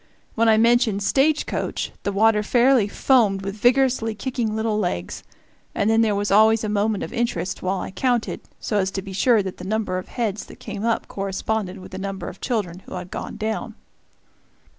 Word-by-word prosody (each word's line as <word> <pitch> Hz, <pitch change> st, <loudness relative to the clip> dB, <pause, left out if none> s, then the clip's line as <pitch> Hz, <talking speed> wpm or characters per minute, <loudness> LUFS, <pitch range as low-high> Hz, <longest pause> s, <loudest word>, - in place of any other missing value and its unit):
When 230 Hz, 0 st, +3 dB
I 220 Hz, -, +5 dB
mentioned 230 Hz, -3 st, +3 dB
"stage 290 Hz, +8 st, +2 dB
coach," -, -, -3 dB
the 200 Hz, -, -2 dB
water 210 Hz, +1 st, +3 dB
fairly 245 Hz, 0 st, +3 dB
foamed 205 Hz, -4 st, +2 dB
with 195 Hz, 0 st, -3 dB
vigorously 245 Hz, -1 st, +2 dB
kicking 230 Hz, -1 st, -2 dB
little 220 Hz, -1 st, 0 dB
legs; 90 Hz, -, -3 dB, 0.5 s
and 205 Hz, +2 st, +2 dB
then 225 Hz, 0 st, +4 dB
there 215 Hz, -2 st, +2 dB
was 205 Hz, 0 st, -1 dB
always 220 Hz, +2 st, +5 dB
a 215 Hz, -, -1 dB
moment 210 Hz, 0 st, 0 dB
of -, -, -6 dB
interest 230 Hz, -6 st, -2 dB
while 185 Hz, +1 st, -1 dB
I -, -, -5 dB
counted, 245 Hz, +2 st, -1 dB, 0.2 s
so 210 Hz, -, -1 dB
as 190 Hz, -1 st, +1 dB
to 195 Hz, 0 st, -4 dB
be 195 Hz, -1 st, -8 dB
sure 220 Hz, +2 st, +3 dB
that 190 Hz, -1 st, -6 dB
the -, -, -9 dB
number 205 Hz, -2 st, -1 dB
of 185 Hz, -, -9 dB
heads 215 Hz, -4 st, -3 dB
that -, -, -13 dB
came 210 Hz, -1 st, -6 dB
up 230 Hz, 0 st, 0 dB
corresponded 195 Hz, 0 st, -3 dB
with 185 Hz, -, -11 dB
the 190 Hz, -, -6 dB
number 195 Hz, -1 st, -5 dB
of 185 Hz, -, -13 dB
children 200 Hz, -8 st, -2 dB
who -, -, -7 dB
had 180 Hz, 0 st, -7 dB
gone -, -, -6 dB
down. 220 Hz, +1 st, -3 dB
215 Hz, 200 wpm, -23 LUFS, 195-230 Hz, 0.5 s, I